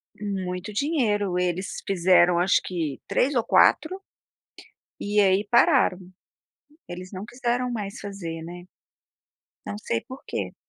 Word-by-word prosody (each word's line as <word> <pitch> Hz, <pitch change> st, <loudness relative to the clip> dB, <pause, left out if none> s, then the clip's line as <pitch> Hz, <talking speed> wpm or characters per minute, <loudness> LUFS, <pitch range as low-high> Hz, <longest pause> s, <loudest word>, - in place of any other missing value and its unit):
Muito 195 Hz, -1 st, -4 dB
dinheiro, 210 Hz, -, 0 dB
eles 180 Hz, +1 st, -2 dB
fizeram 180 Hz, -2 st, +4 dB
acho 185 Hz, +2 st, +4 dB
que 160 Hz, -6 st, -3 dB
3 275 Hz, +2 st, +1 dB
ou 235 Hz, -, +2 dB
4, 370 Hz, -, +3 dB, 1.0 s
e 205 Hz, +1 st, 0 dB
aí 195 Hz, 0 st, +3 dB
pararam. 205 Hz, -5 st, +4 dB, 0.9 s
Eles 180 Hz, +2 st, -8 dB
não 190 Hz, +1 st, -6 dB
quiseram 245 Hz, +1 st, -2 dB
mais 210 Hz, -2 st, -5 dB
fazer, 170 Hz, -5 st, -6 dB
né, 175 Hz, +1 st, -9 dB, 1.0 s
não 100 Hz, -, -4 dB
sei 115 Hz, +1 st, -2 dB
porquê. 260 Hz, +1 st, -6 dB
195 Hz, 120 wpm, -25 LUFS, 180-235 Hz, 1.0 s, fizeram